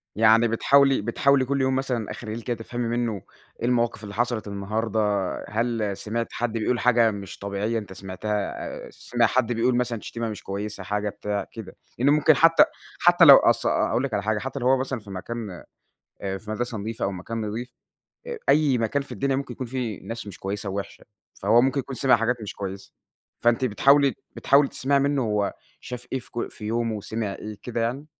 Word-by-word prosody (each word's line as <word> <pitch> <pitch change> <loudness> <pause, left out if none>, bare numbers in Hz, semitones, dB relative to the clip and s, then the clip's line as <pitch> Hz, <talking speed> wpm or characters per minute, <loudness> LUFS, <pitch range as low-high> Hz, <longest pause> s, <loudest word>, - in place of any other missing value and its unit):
يعني 110 +2 +5
بتحاولي 135 +4 +4
بتحاولي 130 +5 +2
كُلّ 140 +1 0
يوم 130 0 +2
مثلًا 125 -5 -2
أخر 120 - -8
الليل 110 +2 -4
كده 120 +1 -3
تفهمي 120 +1 -4
منُّه 115 -5 -1 0.4
إيه - - -2
المواقف 120 -3 +1
اللي 100 -1 -7
حصلت 120 -2 -1
النهارده، 105 +2 -2 0.5
هل 110 -2 -1
سمعت 115 +2 -3
حد 120 -2 -2
بيقول 115 +2 0
حاجة 120 -2 +4
مش 100 -2 -7
طبيعية، 100 +3 -2
أنت 105 -3 -9
سمعتها 95 +2 -6 0.5
آآ، - - -11
سمع 120 -1 0
حد 120 +1 +1
بيقول 120 +2 +2
مثلًا 120 -3 -1
شتيمة 115 -1 -4
مش 105 - -7
كويسة 100 0 -5
حاجة 105 +2 -1
بتاع، 105 0 -3
كده، 110 -5 -9 0.2
لإن 130 +4 +4
ممكن 150 +1 +5
حتى 165 +4 +6 0.4
حتى 175 0 +6
لو 140 -3 +11
أص - - +2
أ-أ - - +4 0.2
قول 125 - +1
لِك 135 -4 -3
على 100 -1 0
حاجة 110 +1 0
حتى 135 +4 -5
لو 125 - 0
هو 135 +1 +5
مثلًا 130 -1 -2
في 105 -1 -14
مكان 100 0 -6 0.6
آآ، 95 -1 -3
في 105 +2 -10
مدرسة 120 +1 -3
نضيفة 110 +3 -4
أو 100 - -1
مكان 105 +5 -5
نضيف 115 +4 -4 0.6
آآ، 475 -1 -4
أي 145 -3 +4
مكان 115 +5 0
في 140 - -10
الدنيا 135 +4 0
ممكن 135 -2 -4
يكون 130 +1 -6
فيه 120 -5 -3
ناس 115 -1 -6
مش 100 - -9
كويسة 100 +1 -4
ووحشة، 100 +1 -6 0.4
فهو 110 +4 +5
ممكن 135 +2 +1
يكون 135 0 -5
سمع 130 0 +4
حاجات 115 +2 +1
مش 105 - -6
كويسة، 95 0 -6 0.5
فأنتِ 120 +2 +2
بتحاولي 140 +4 +4 0.2
بتحاولي 140 +1 +4
تسمعي 140 +1 +1
منُّه 140 0 +1
هو 105 -3 0 0.3
شاف 125 0 -8
إيه 130 - 0
في 120 - -15
ك 120 - -4
في 105 - -9
يومُه 115 0 -1
وسمع 105 0 -3
إيه 105 -1 -8
كده 120 -1 -3
يعني؟ 125 +6 -2
115 Hz, 200 wpm, -25 LUFS, 105-130 Hz, 0.6 s, لو